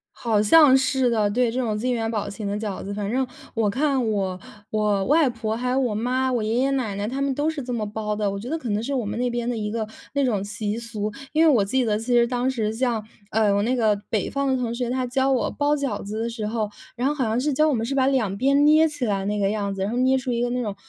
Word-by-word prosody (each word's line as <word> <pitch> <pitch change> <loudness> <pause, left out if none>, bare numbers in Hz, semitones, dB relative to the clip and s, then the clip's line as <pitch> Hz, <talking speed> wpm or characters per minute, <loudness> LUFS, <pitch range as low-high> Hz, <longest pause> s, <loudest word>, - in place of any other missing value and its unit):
好 220 -3 +1
像 270 +4 +7
是 260 -1 +2
的， 215 -3 +1
对， 245 +2 +2
这 250 +3 -2
种 220 -4 -1
金 250 +3 0
元 225 -2 -1
宝 210 -3 -2
形 205 +1 -6
的 200 +1 -2
饺 210 -3 -4
子。 200 - -5
反 200 0 -3
正 260 +2 0 0.3
我 220 -3 +1
看 265 -1 +1
我 190 -3 -1 0.3
我 210 -2 +1
外 300 +3 +4
婆 225 -2 -3
还 250 +2 -2
有 255 - +1
我 250 -5 0
妈， 255 +4 0
我 240 -3 0
爷 215 +1 -1
爷 265 +2 +2
奶 235 -7 -1
奶 200 +1 -2
他 260 +5 -3
们 275 -1 +1
都 290 +3 0
是 315 -3 -3
这 250 0 -5
么 220 -3 -2
包 210 0 -3
的， 210 -1 0
我 200 0 -3
觉 235 +6 -7
得 325 - -1
可 255 - -6
能 210 +1 0
是 270 +5 -3
我 250 -4 -1
们 210 +1 -3
那 245 0 0
边 240 0 -2
的 245 - -1
一 210 -1 -3
个 220 0 -2 0.3
那 280 -1 +2
种 215 -7 0
习 205 +1 -3
俗。 225 -3 -4 0.2
因 315 +2 +4
为 - - +7
我 220 -7 +3
记 255 +6 +1
得 215 -2 +1
其 225 - -8
实 240 -1 +4
当 250 +1 0
时 220 -5 -1
像， 230 -2 -1 0.3
呃， 215 -2 +2
我 200 0 +2
那 250 +4 +1
个 220 -3 +3 0.2
北 215 -4 0
方 280 0 -1
的 265 - +2
同 240 -2 -2
学， 240 0 -2
他 255 0 -1
教 265 +2 +1
我 260 -2 +1
包 295 0 +1
饺 280 -2 -2
子 210 +2 -5
的 230 - -1
时 230 -2 -4
候， 215 -1 -1 0.3
然 250 +2 -1
后 295 - 0
好 275 -4 -1
像 225 +2 0
是 295 +3 0
教 305 +3 +3
我 295 - +2
们 225 -1 -1
是 275 - -2
把 265 -1 +3
两 225 -8 0
边 275 +6 +3
捏 310 +2 +6
起 295 -4 -4
来 200 -4 -1
那 210 +1 -1
个 200 -1 +1
样 205 -2 -2
子， 195 -1 -4
然 195 - -1
后 235 - -3
捏 260 +1 +3
出 255 -1 -3
一 235 0 0
个 245 - 0
那 250 +1 -1
种 210 -5 -3
235 Hz, 320 characters per minute, -24 LUFS, 210-260 Hz, 0.3 s, 像